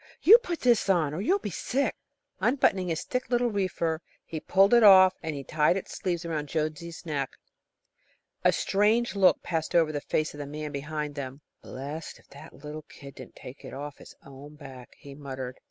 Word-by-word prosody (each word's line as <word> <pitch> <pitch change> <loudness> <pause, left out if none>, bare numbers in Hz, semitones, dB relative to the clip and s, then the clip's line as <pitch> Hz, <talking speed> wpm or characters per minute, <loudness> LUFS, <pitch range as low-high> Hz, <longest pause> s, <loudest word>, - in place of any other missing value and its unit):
put 350 -8 -4
this 240 -5 +3
on, 160 -6 +2
or 165 - -3
you'll 370 - +2
be 205 - -6
sick," 270 +10 -1 0.4
Unbuttoning 195 -8 +2
his 165 -2 -2
thick 250 -2 -3
little 240 -1 +1
reefer, 175 -5 -1 0.2
he 160 - -5
pulled 195 +6 +3
it 240 - +7
off 190 -3 +8
and 145 -4 -5
tied 155 +4 +2
its 195 - -7
sleeves 175 -3 -3
around 155 -3 -3
Jonesy's 160 +2 -4
neck. 140 -4 -3 1.1
A - - +5
strange 215 +4 +1
look 190 -2 +4
passed 165 -1 -3
over 165 -2 +4
the 145 -1 -3
face 155 +2 -1
of 145 - -11
the 145 - -5
man 150 +1 -6
behind 150 +1 -4
them. 140 0 -7 0.2
"Blessed 145 +5 -7
if - - -23
the 140 0 -12
little 150 +2 -9
kid 140 -1 -12
didn't - - -12
take 130 +3 -12
it - - -9
off 145 +1 -7
his - - -14
own 140 +2 -12
back," 135 -4 -12
he 140 - -12
muttered. 135 -3 -7
155 Hz, 185 wpm, -27 LUFS, 145-190 Hz, 1.1 s, off